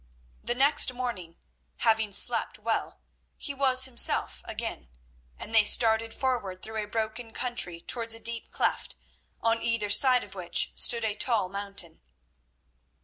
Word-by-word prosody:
The 240 - -3
next 280 +1 +4
morning, 205 -10 -7 0.4
having 220 -2 0
slept 200 - +2
well, - - -4 0.4
he 285 - -4
was 260 -1 +4
himself 255 -2 +1
again, - - -7 0.5
and 225 - -10
they 220 -1 +6
started 225 +1 +4
forward 225 -8 -4
through 220 0 -5
a - - -10
broken 225 +1 -5
country 210 -9 0
towards 230 +3 -1
a - - -10
deep 230 0 -1
cleft, - - -3 0.5
on 230 0 0
either 230 -3 -2
side 255 +2 +5
of 200 - -12
which 180 -3 0
stood 235 -1 +2
a 215 - -2
tall 210 -3 +1
mountain. 195 -4 -4
225 Hz, 145 wpm, -26 LUFS, 205-245 Hz, 0.5 s, they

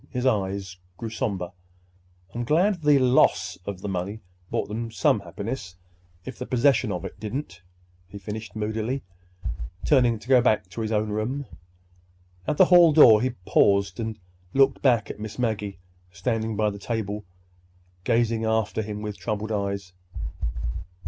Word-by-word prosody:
His 125 -1 -3
eyes 95 -5 0 0.2
grew 115 -1 -5
somber. 95 -5 -2 0.8
"I'm 120 - -2
glad 175 - +2
the 150 -2 +5
loss 130 -1 +3
of 100 -2 -5
the 105 - -4
money 95 +3 -3 0.3
brought - - -1
them 115 +3 -4
some 110 - +2
happiness—if 90 -5 -8
the 125 - -5
possession 125 -3 +3
of 90 -3 -3
it - - -8
didn't," 105 -4 -5 0.5
he 100 - -10
finished 105 +3 -7
moodily, 110 +5 -2 0.8
turning 125 -5 +4
to 110 +2 -15
go 130 -2 +6
to 105 -5 0
his 110 0 -2
own 105 0 +1
room. 125 +7 -2 1.0
At 150 - 0
the 185 - +8
hall 175 -3 +7
door 115 -8 +8
he 130 - +1 0.2
paused 100 +1 +3
and 110 -1 -3 0.4
looked 135 0 +4
back 120 -5 +3
at - - -11
Miss 110 0 -6
Maggie, 105 -5 -2 0.3
standing 115 +3 -2
by 105 0 +1
the 100 - -8
table, 105 -1 -3 0.8
gazing 115 0 +1
after 110 -1 0
him 105 0 -5
with 105 -1 -5
troubled 110 0 -3
eyes. 100 -3 -2
110 Hz, 150 wpm, -25 LUFS, 100-125 Hz, 1.0 s, the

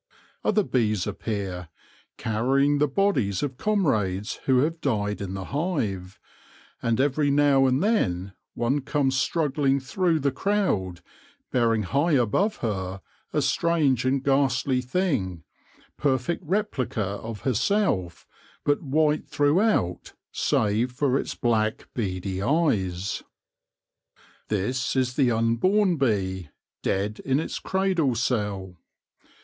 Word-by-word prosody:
Other 210 0 +2
bees 110 - 0
appear, 100 -4 -4 0.5
carry 125 +5 +1
ing 145 0 +2
the 150 - +3
bodies 135 - +1
of 135 -3 -3
comrades 110 - 0
who 130 -1 +4
have 165 +3 -1
died 105 -6 -1
in 95 -1 -4
the 95 - -4
hive; 110 - -2 0.6
and 115 0 0
every 145 +1 +2
now 140 -1 +4
and 130 +5 +1
then 95 - 0 0.2
one 130 +5 0
comes 135 0 0
struggling 140 -1 +1
through 165 +5 0
the 140 -1 +1
crowd, 130 - -1 0.5
bearing 115 -3 +2
high 145 - +1
above 145 - +2
her 95 -3 -3 0.3
a - - +1
strange 155 -7 +2
and 130 +1 +1
ghastly 135 -1 +2
thing, 125 - -1 0.5
perfect 140 +5 0
replica 175 - -1
of 105 +2 -6
herself, 125 - 0 0.4
but 145 0 +2
white 150 +1 +1
throughout, 145 - +1 0.2
save 110 +4 +1
for 135 +1 0
its - - -4
black 110 -2 0
beady 95 -3 -3
eyes. 100 - 0 1.3
This 110 +7 -1
is 130 -1 +1
the 135 -4 +3
unborn 160 - +2
bee, 95 - -1 0.3
dead 105 +2 -1
in 135 +1 0
its 160 - -4
cradle 185 -9 +1
cell. 105 -6 -2
130 Hz, 120 wpm, -25 LUFS, 105-145 Hz, 1.3 s, who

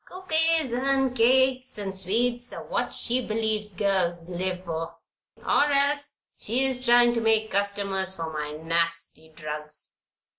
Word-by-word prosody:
Cookies 325 -5 +1
and 265 +1 0
cakes 260 +1 +3
and 200 -2 -4
sweets 235 +6 0
are - - -7
what - - -2
she 250 +1 0
believes 215 -2 -2
girls 180 -4 0
live 180 +1 -3
for; 165 0 -5 0.5
or - - +3
else 285 +1 +1
she 250 +5 0
is 255 -1 -2
trying 240 -1 +5
to 230 - -1
make 220 -1 +2
customers 195 -1 -1
for 165 -2 -5
my 150 -1 -4
nasty 165 0 -1
drugs." 150 -1 -6
215 Hz, 140 wpm, -25 LUFS, 170-255 Hz, 0.5 s, trying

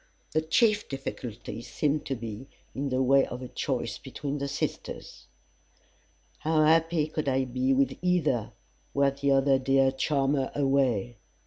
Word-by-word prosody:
The 155 - +2
chief 210 +7 +2
difficulty 125 -4 -6
seemed 150 +4 -1
to 135 - -1
be, 115 +1 -7 0.3
in 140 +1 -2
the 130 0 +1
way 135 +1 +5
of 125 +1 -6
a - - -5
choice - - -3
between 145 0 -5
the 140 - -2
sisters. 140 - -5 1.1
"How 155 0 +2
happy 165 0 +3
could 155 -2 -2
I 130 0 +1
be 130 +1 0
with 135 +1 +2
either, 160 -11 +1 0.4
Were 140 0 +4
t'other 140 -1 +2
dear 135 0 +3
charmer 135 0 0
away." 130 -5 +1
135 Hz, 140 wpm, -28 LUFS, 130-150 Hz, 1.1 s, way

